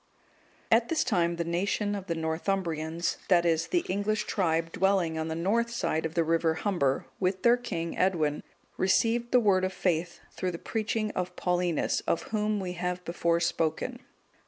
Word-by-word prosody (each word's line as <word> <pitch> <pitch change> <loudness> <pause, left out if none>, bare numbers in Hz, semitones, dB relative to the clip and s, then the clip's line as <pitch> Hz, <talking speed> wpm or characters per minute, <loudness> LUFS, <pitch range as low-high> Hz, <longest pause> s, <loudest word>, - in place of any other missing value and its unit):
] - - -33 0.3
At 230 +1 +4
this 330 - +2
time 170 -8 +1
the 170 - -1
nation 200 +5 -1
of 200 -2 -5
the 170 - -1
Northumbrians, 165 0 -2
that 175 -2 +4
is, 165 -1 +2
the 350 - 0
English 205 +3 0
tribe 165 -3 0
dwelling 190 -4 +1
on 160 0 -2
the 160 - -3
north 215 +8 +1
side 160 -8 -1
of 160 - -14
the 170 - +3
river 165 0 +1
Humber, 160 -10 0
with 185 0 0
their 240 0 +6
king, 175 -9 -4
Edwin,(206) 160 -6 +1 0.3
received 230 +5 +2
the 250 - +6
Word 195 -5 +3
of 185 0 -1
faith 175 -2 -1
through 185 -1 -3
the - - -4
preaching 215 +1 -2
of 180 0 -3
Paulinus,(207) 180 -2 0
of - - +1
whom 210 -1 -1
we 185 -2 -3
have 180 0 -3
before 170 0 +1
spoken. 170 +8 -1
180 Hz, 180 wpm, -28 LUFS, 165-205 Hz, 0.3 s, their